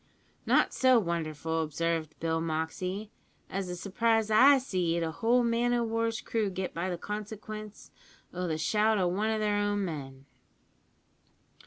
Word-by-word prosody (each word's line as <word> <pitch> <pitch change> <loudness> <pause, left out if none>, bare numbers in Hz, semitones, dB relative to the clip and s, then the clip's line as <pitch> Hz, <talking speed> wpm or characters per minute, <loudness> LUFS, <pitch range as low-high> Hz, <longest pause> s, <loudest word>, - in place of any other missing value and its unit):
"Not - - +3
so 260 -1 +5
wonderful," 165 -4 -1
observed 160 0 -2
Bill 165 0 0
Moxey, 180 +6 -3 0.4
"as 195 -1 -2
the 180 - -4
surprise 220 +4 +1
I 270 +6 +7
seed 180 -9 -1
a 160 - -2
whole 235 +7 +2
man 235 +1 +1
o' 240 - +1
war's 230 0 -1
crew 220 -3 -1
get 190 0 -4
by 175 +1 -2
consequence 215 +1 -7 0.4
o' 180 0 -3
the 160 -2 -1
shout 215 +6 +2
o' 185 -2 +2
one 200 +5 0
of 220 -1 0
her 215 - +1
own 205 -1 0
men." 135 -5 -7
195 Hz, 150 wpm, -29 LUFS, 165-220 Hz, 0.4 s, I